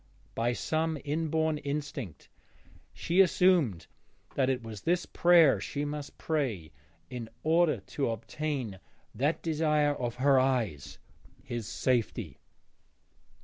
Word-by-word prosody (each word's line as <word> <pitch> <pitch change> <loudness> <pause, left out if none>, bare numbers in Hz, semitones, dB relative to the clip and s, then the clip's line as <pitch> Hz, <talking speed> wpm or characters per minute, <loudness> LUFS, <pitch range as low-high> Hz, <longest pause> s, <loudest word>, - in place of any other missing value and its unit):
By 120 +1 0
some 160 +4 -1
inborn 160 +1 0
instinct 140 - -5 0.6
she 175 +3 +2
assumed 175 - +3 0.5
that 130 -1 +1
it 130 -2 -1
was 110 -3 -8
this 175 +2 +1
prayer 170 -5 +5
she 145 0 -3
must 145 -1 -6
pray 125 - -2 0.4
in 120 -3 -6
order 165 0 +3
to 140 -4 -2
obtain 115 -1 -4 0.3
that 145 +8 0
desire 150 -2 +2
of 120 -4 -3
her 135 +1 +4
eyes, 120 - -1 0.5
his 120 -3 -5
safety. 120 -1 -1
145 Hz, 110 wpm, -30 LUFS, 120-160 Hz, 0.6 s, prayer